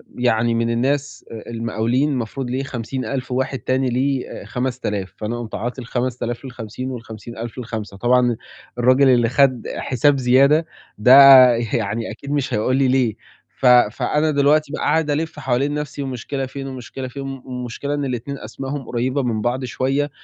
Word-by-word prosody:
يعني 120 -1 +1
من 115 0 0
الناس 135 +4 -1
آآ 115 0 -9
المقاولين 115 +4 0
المفروض 125 +1 -3
ليه 130 +2 -2
50.000 130 +1 -4
وواحد 130 +1 -1
تاني 130 0 0
ليه 130 +2 -1
آآ - - -8
5000، 105 -7 -3
فأنا 115 +2 -4
قُمت 115 -2 -6
عاطي 125 +3 -4
ال5000 120 +1 -3
لل50 125 +1 -6
وال50000 115 0 -8
لل5، 110 -4 -6
طبعًا 120 +1 +3 0.4
الرجل 130 +2 +4
اللي 120 -2 +4
خَد 130 -2 +2
حساب 140 +2 +2
زيادة 135 +5 +4 0.3
ده 125 +5 +6 0.4
يعني 115 -1 -2
أكيد 140 +6 -8
مش 145 -2 -1
هيقول 120 +5 +1
لي 135 -1 +3
ليه، 125 -4 +2 0.4
ف - - -2
فأنا 125 +5 +3
دلوقتي 145 +1 +2
بقى - - -4
قاعد 155 0 +1
ألِف 155 +1 -2
حوالين 135 +2 0
نَفْسي 150 -2 -4
والمشكلة 135 +1 -4
فين 135 +1 -7
والمشكلة 130 0 -7
فين، 135 +2 -7
م 135 -1 -6
المشكلة 125 +2 -4
إن 145 -1 -2
ال2 130 +2 -4
أسمائهم 135 +4 -6
قريّبة 130 +3 -1
من 115 -3 -1
بعض 125 +3 -1
شوية، 135 +4 -1
125 Hz, 160 wpm, -20 LUFS, 120-135 Hz, 0.4 s, ده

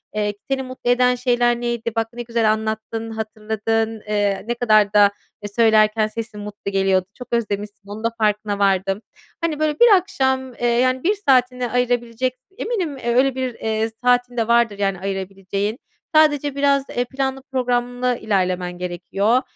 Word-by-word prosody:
Eee, 210 -1 0 0.2
seni 270 0 0
mutlu 255 -1 -5
eden 250 0 +3
şeyler 240 -1 +1
neydi? 235 -1 -2
Bak 225 0 0
ne 240 - -6
güzel 230 -2 +1
anlattın, 220 +1 -4
hatırladın. 220 0 -2
Eee, 205 -2 0
ne 240 - 0
kadar 215 -4 +3
da, 205 -1 +6 0.3
eee, 205 - -4
söylerken 215 -1 +4
sesin 220 -1 -7
mutlu 205 -1 -6
geliyordu. 190 -1 +2
Çok 250 +1 -10
özlemişsin. 210 -3 -2
Onun 210 +2 -7
da 230 - +2
farkına 210 -2 0
vardım. 195 0 +1 0.4
Hani 325 -3 -1
böyle 305 -1 0
bir 480 - +8
akşam, 265 -8 0
eee, 240 - -1
yani 255 +2 +2
1 405 +5 +2
saatini 250 -2 +3
ayırabilecek, 245 0 0 0.2
eminim 380 - -2
öyle 255 +2 +3
1, 260 -1 -2
eee, 220 0 -1
saatin 245 0 +2
de 225 -1 +1
vardır 235 -3 +2
yani 195 -2 0
ayırabileceğin. 195 +3 -3 0.4
Sadece 295 -2 +4
biraz, 280 -1 +2
eee, 245 - -1
planlı 265 +1 -3
programlı 245 -1 0
ilerlemen 180 -3 -1
gerekiyor. 195 +6 0
230 Hz, 155 wpm, -21 LUFS, 210-250 Hz, 0.4 s, bir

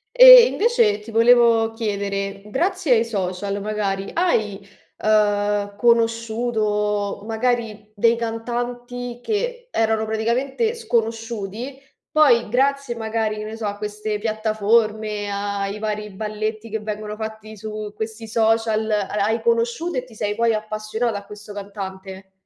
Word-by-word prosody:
E - - +11
invece 400 - +2
ti 215 +2 -11
volevo 230 -1 +5
chiedere, 200 -3 -3
grazie 340 - +1
ai 230 -1 +3
social, 200 -1 -3
magari, 200 -2 -2
hai, 215 - 0 0.3
ehm, 205 -1 +1
conosciuto 220 -3 0
magari 225 -2 -2
dei 230 +3 +3
cantanti 240 +1 -4
che 485 - -3
erano 220 - +1
praticamente 245 - 0
sconosciuti? 230 - -3 0.3
Poi 250 -8 +4
grazie 275 0 +1
magari, 220 -1 -2
che 210 - -5
ne 215 +1 -6
so, 225 -1 -5
a 205 - -4
queste 210 0 -3
piattaforme, 215 -1 0
ai 200 0 -3
vari 210 0 -3
balletti 215 +2 -4
che 220 - -2
vengono 210 0 -5
fatti 220 0 -7
su 215 0 -6
questi 220 +1 -6
social, 220 0 +1
ha 210 -2 0 0.2
hai 220 +3 +1
conosciuto 235 +8 0
e - - -7
ti 245 -3 -16
sei 205 0 -1
poi 230 +1 +2
appassionata 215 +1 -2
a 200 - -16
questo 210 0 -10
cantante? 190 -1 -8
220 Hz, 130 wpm, -22 LUFS, 210-235 Hz, 0.3 s, E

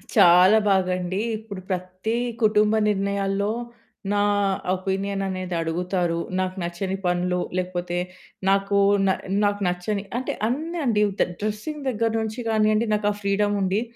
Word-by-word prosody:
చాలా 180 +5 +7
బాగండి. 185 0 +1 0.2
ఇప్పుడు 210 -3 -8
ప్రతీ 185 +5 -2 0.3
కుటుంబ 210 0 +4 0.2
నిర్ణయాల్లో 200 0 0 0.6
నా 205 - +2 0.5
ఒపీనియన్ 195 +1 -2
అనేది 185 -1 -3
అడుగుతారు. 175 +1 -1 0.2
నాకు 185 0 -1
నచ్చని 180 +3 -3
పనులు 180 0 +1 0.2
లేకపోతే 180 -1 -2 0.5
నాకు 195 +1 +2 0.3
న - - +4 0.3
నాకు 205 0 +1
నచ్చని 185 +3 -2
అంటే 260 - -2
అన్నీ 315 +8 -2
అండి 215 -4 +2 0.2
ద - - +6 0.2
డ్రెసింగ్ 215 +9 -3
దగ్గర 230 -1 0
నుంచి 220 +2 -4
కానియండి 215 0 +2
నాకు 210 0 +1
ఆ - - -3
ఫ్రీడమ్ 205 +1 +1
ఉంది. 195 +3 +1
195 Hz, 130 wpm, -24 LUFS, 185-210 Hz, 0.6 s, చాలా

